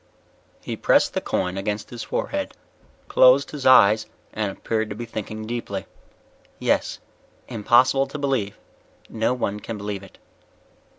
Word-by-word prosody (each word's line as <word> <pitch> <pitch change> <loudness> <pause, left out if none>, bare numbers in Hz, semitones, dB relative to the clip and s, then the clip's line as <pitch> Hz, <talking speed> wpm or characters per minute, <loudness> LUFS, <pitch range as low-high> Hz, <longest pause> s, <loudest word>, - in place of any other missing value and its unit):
_He - - -5
pressed - - +4
the - - -1
coin 90 +1 -2
against 105 +1 -3
his 120 -1 -6
forehead, 290 0 -3 0.5
closed - - +5
his 145 -3 -2
eyes 110 -4 +6 0.3
and 105 -2 -1
appeared 110 +2 -2
to 105 - -5
be 120 +2 -6
thinking 110 -1 -6
deeply. 110 -4 -4 0.7
"Yes, - - 0 0.5
impossible 125 +4 +3
to 140 - -7
believe. 135 -8 -1 0.5
No 115 +3 0
one 105 -4 -2
can 110 +1 -6
believe 100 -1 -4
it." 95 - -15
110 Hz, 135 wpm, -23 LUFS, 105-130 Hz, 0.7 s, eyes